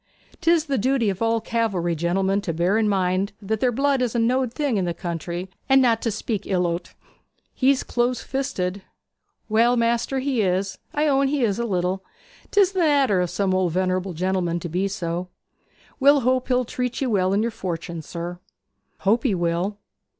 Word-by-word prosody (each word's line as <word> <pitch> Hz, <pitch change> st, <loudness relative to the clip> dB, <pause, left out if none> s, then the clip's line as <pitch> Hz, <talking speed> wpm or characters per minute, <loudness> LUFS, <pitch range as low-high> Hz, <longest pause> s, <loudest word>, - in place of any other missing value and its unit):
'Tis 335 Hz, -2 st, +3 dB
the 275 Hz, -4 st, 0 dB
duty 245 Hz, -2 st, +2 dB
of 190 Hz, -, -7 dB
all 230 Hz, 0 st, +2 dB
cavalry 205 Hz, -7 st, -1 dB
gentlemen 190 Hz, +4 st, 0 dB
to 185 Hz, -, -3 dB
bear 175 Hz, +5 st, +1 dB
in 220 Hz, -1 st, +2 dB
mind 190 Hz, 0 st, 0 dB
that 215 Hz, +1 st, -2 dB
their 250 Hz, +1 st, +2 dB
blood 275 Hz, +2 st, +1 dB
is 245 Hz, -2 st, -1 dB
a -, -, +2 dB
knowed 245 Hz, +2 st, +1 dB
thing 275 Hz, -3 st, -1 dB
in 190 Hz, -, 0 dB
the 170 Hz, -1 st, -2 dB
country, 175 Hz, +1 st, -4 dB, 0.2 s
and 270 Hz, 0 st, +6 dB
not 235 Hz, -3 st, +3 dB
to 230 Hz, -, 0 dB
speak 215 Hz, -1 st, -3 dB
ill 180 Hz, -2 st, +1 dB
o't.' 170 Hz, +1 st, -3 dB, 0.6 s
'He's 270 Hz, 0 st, +2 dB
close 245 Hz, 0 st, 0 dB
fisted.' 200 Hz, -8 st, -3 dB, 0.7 s
'Well, 230 Hz, +3 st, +3 dB
maister, 235 Hz, +3 st, +1 dB
he 260 Hz, -3 st, 0 dB
is 190 Hz, 0 st, -1 dB
I 300 Hz, +1 st, 0 dB
own 275 Hz, -1 st, +3 dB
he 280 Hz, -1 st, 0 dB
is 210 Hz, -2 st, +1 dB
a 235 Hz, -, 0 dB
little. 185 Hz, -1 st, -1 dB, 0.5 s
'Tis 400 Hz, -2 st, +4 dB
the 380 Hz, -, -2 dB
nater 280 Hz, -, +3 dB
of 180 Hz, -, -1 dB
some 195 Hz, 0 st, 0 dB
old 185 Hz, -3 st, +1 dB
venerable 185 Hz, 0 st, 0 dB
gentlemen 175 Hz, 0 st, -1 dB
to 175 Hz, -, -5 dB
be 185 Hz, +4 st, 0 dB
so. 180 Hz, -3 st, -3 dB, 0.7 s
We'll 285 Hz, +1 st, +5 dB
hope 255 Hz, +1 st, +1 dB
he'll 250 Hz, -1 st, +2 dB
treat 250 Hz, +1 st, -3 dB
ye 275 Hz, -, 0 dB
well 190 Hz, -5 st, +2 dB
in 205 Hz, +2 st, +2 dB
yer 235 Hz, -, -1 dB
fortune, 170 Hz, -5 st, -5 dB
sir.' 170 Hz, +3 st, -6 dB, 0.6 s
'Hope 220 Hz, +4 st, +3 dB
he 225 Hz, -6 st, +1 dB
will. 175 Hz, +4 st, -1 dB
205 Hz, 190 wpm, -23 LUFS, 180-250 Hz, 0.7 s, and